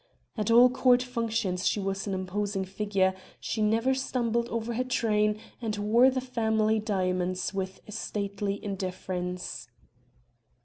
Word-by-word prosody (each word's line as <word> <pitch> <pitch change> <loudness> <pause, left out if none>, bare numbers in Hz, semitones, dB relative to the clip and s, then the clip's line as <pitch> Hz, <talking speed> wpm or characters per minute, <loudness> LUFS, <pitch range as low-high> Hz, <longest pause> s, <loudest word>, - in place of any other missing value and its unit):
At 215 -1 -1
all 240 +2 +8
court 250 -1 +4
functions 225 -7 -1
she - - +1
was 195 0 -2
an 195 - -1
imposing 195 +1 -2
figure, 195 -1 +1 0.3
she 220 - -3
never 225 +5 +3
stumbled 235 -3 -1
over 230 0 -2
her 250 +3 0
train 215 -4 +1 0.2
and 215 -3 -2
wore 225 +5 +5
the 260 0 -1
family 220 -3 +1
diamonds 185 -3 -1
with 190 -1 -4
stately 200 -1 -3
indifference. 180 -3 -4
210 Hz, 130 wpm, -28 LUFS, 195-235 Hz, 0.3 s, all